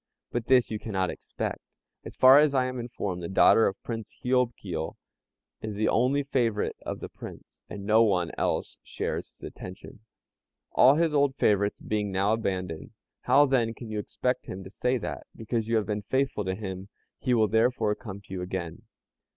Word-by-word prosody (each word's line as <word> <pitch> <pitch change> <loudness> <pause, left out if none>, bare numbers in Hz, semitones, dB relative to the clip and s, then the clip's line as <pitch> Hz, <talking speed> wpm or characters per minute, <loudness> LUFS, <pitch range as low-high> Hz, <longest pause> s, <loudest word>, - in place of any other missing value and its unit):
but 120 -1 -3
this 130 -3 +4
you 110 - -2
cannot 95 -5 -1
expect. - - -5 0.4
As - - -9
far 130 +2 +8
as 150 -2 +3
I 130 -1 +3
am 130 0 -4
informed 100 -6 -4
the 85 - -5
daughter 110 +3 +5
of 95 - -3
Prince 115 -3 -6
Hiob 125 -1 +2
Kio 80 -5 -5 0.6
is 110 -1 -5
the 110 +2 +1
only 130 +5 +2
favorite 120 -6 0
of - - -5
the - - -5
Prince, - - -12
and 100 -1 -7
no 110 +2 +5
one 90 -6 +2
else - - -2
shares - - -4
his - - -22
attention, 90 +3 -9 0.7
all 135 +3 +6
his 165 -1 +2
old 140 -2 +3
favorites 100 -5 +2
being 105 -2 -2
now 100 +3 +2
abandoned. 90 -7 -3 0.3
How, 145 +1 +6
then, 120 -4 +1
can 115 0 -9
you 105 - -2
expect 125 +4 -2
him 95 +1 -6
to 95 - -11
say 125 +4 0
that, 115 - -6
because 115 0 -2
you 115 - +1
have 110 -2 +2
been 105 -1 -2
faithful 130 -1 -1
to 95 0 -1
him, 95 -1 -6 0.3
he 125 -2 +1
will 110 -2 +4
therefore 110 0 +2
come 100 -3 -8
to 95 - -12
you 95 - -3
again?" 90 -2 -5
110 Hz, 190 wpm, -27 LUFS, 100-125 Hz, 0.7 s, far